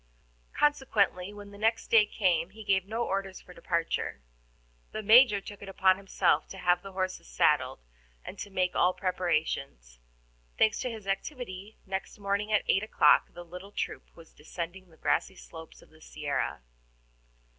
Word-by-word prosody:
Consequently, 220 -10 +1
when 205 -1 -11
next 225 +3 -1
day 215 -2 +6
came, 180 -5 +1
he 220 +3 -11
gave 195 -2 +1
no 225 +3 -2
orders 195 -1 -3
for 180 - -15
departure; 170 - -2 0.7
the 215 - -4
Major 220 0 +7
took 205 +1 -11
it 200 - -8
upon 190 0 +3
himself 185 -5 +1
to 190 - -10
have 180 -1 +2
the 195 0 -10
horses 185 - -3
saddled, - - +2 0.4
and 195 - -6
make 185 -2 0
all 180 +1 +3
preparations. 155 - -2 0.6
Thanks 220 - +3
to 255 - -2
his 220 -4 -8
activity, 200 -1 -5
next 190 0 -5
morning 200 +1 -1
at 210 - +3
eight 195 - +3
o'clock 210 -8 +4
the 175 0 -9
little 180 +4 -10
troop - - -4
was 165 -1 -16
descending 175 +4 -7
the 160 - -20
grassy 190 - 0
slopes 160 -2 -12
of - - -22
the 155 0 -20
Sierra. 145 - -3
190 Hz, 155 wpm, -29 LUFS, 175-205 Hz, 0.7 s, Major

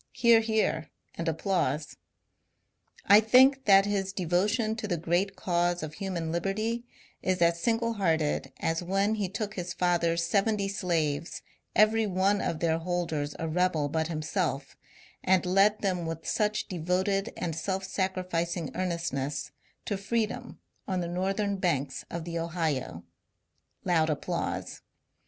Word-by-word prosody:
(Hear, 235 -1 +5
hear, 220 -8 0 0.2
and 170 - -5
applause.) 160 -3 -1 1.1
I 205 +2 +8
think 260 +5 +5
that 195 -1 +7
his 195 -2 -1
devotion 205 +6 +1
to 220 - -4
the 175 -4 -1
great 175 +5 0
cause 175 -2 0
of 155 -1 -5
human 175 -3 -3
liberty 215 +7 -1 0.4
is 185 0 0
as 170 0 +3
single 230 +2 +1
hearted 160 -7 0
as 165 +1 0
when 195 +4 +1
be 205 -4 -1
took 210 +2 -4
his 180 -2 -5
father's 170 -1 +1
seventy 200 +2 +1
slaves, 165 -5 -1 0.3
every 215 +1 +4
one 195 +2 +2
of 165 - -2
their 165 -1 +2
holders 165 -4 -2
a 165 - -3
rebel 160 -3 +1
but 160 +1 0
himself, 155 -3 -2 0.5
and 185 -1 +3
led 195 +3 +3
them 180 -4 -1
with 165 0 -5
such 215 -1 0
devoted 190 +4 0
and 165 -3 -3
self 190 +3 -2
sacrificing 180 -4 -2
earnestness 165 -6 -2 0.3
to 205 - -2
freedom 230 +4 -2 0.3
on 185 -2 -1
the 170 - -3
northern 195 +3 -1
banks 145 -8 -1
of 170 -1 -4
the 170 -1 -3
Ohio. 160 - -2 0.8
(Loud 165 -3 +2
applause.) 150 - -3
180 Hz, 140 wpm, -28 LUFS, 165-200 Hz, 1.1 s, I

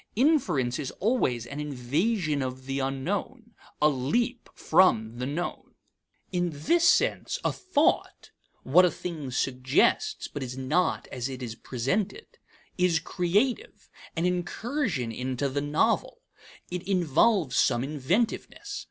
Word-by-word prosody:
Inference 190 - +2
is 140 -3 -3
always 180 - +1
an 140 +4 -7
invasion 150 - 0
of 130 0 -5
the 135 +1 -2
unknown, 195 - -3 0.3
a 150 - +5
leap 190 - -1
from 115 -10 +3
the 125 - -2
known. 165 +5 -4 0.6
In 175 -1 0
this 170 - +3
sense, - - +2
a - - +3
thought 320 -5 0 0.3
(what 170 +8 +6
a 180 - +5
thing 165 -6 -6
suggests 130 0 +1
but 145 - -7
is 125 0 -5
not 155 +7 0
as 125 0 -3
it 130 -1 -6
is 115 -3 -4
presented) 160 - -2 0.5
is 180 -2 +3
creative, 210 - -1 0.2
an 165 +1 0
incursion 180 - -1
into 130 +3 -2
the 140 +1 -2
novel. 145 +1 0 0.5
It 180 0 -3
involves 175 - +2
some 120 - +3
inventiveness. 185 - -2
150 Hz, 125 wpm, -27 LUFS, 130-200 Hz, 0.6 s, what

